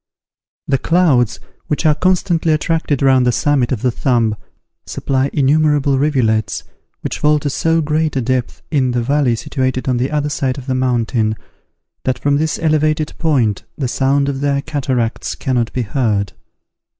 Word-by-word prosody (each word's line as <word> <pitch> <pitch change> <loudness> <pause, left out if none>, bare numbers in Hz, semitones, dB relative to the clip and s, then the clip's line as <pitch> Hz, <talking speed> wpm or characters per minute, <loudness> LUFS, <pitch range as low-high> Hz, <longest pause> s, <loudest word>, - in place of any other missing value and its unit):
The 135 -1 +1
clouds, 150 -10 +2 0.3
which 150 +2 -2
are 155 - +5
constantly 175 -1 +1
attracted 155 -3 0
round 130 -2 +4
the 125 - +3
summit 135 0 +1
of 120 -5 -2
the 125 - +2
Thumb, 115 -3 +1 0.5
supply 135 0 -1
innumerable 145 -1 +2
rivulets, 120 -7 +1 0.4
which - - -4
fall 150 0 +3
to 145 -1 -2
so 165 +3 +1
great 155 0 0
a 135 - +1
depth 125 0 -2
in 130 -5 +1
the 120 -1 0
valley 135 -2 +2
situated 130 +2 -2
on 125 -2 +1
the 125 +3 0
other 150 -1 -1
side 135 -2 -1
of 135 - -8
the 130 - -1
mountain, 120 -4 0 0.7
that 130 -1 0
from 140 0 +1
this 155 +1 -1
elevated 155 -1 +1
point 130 - +1 0.2
the 135 - -1
sound 140 +3 +1
of 140 -1 -3
their 140 -1 0
cataracts 130 -7 -2
cannot 125 -4 -1
be 125 - -2
heard. 105 -4 -1
135 Hz, 160 wpm, -17 LUFS, 125-150 Hz, 0.7 s, are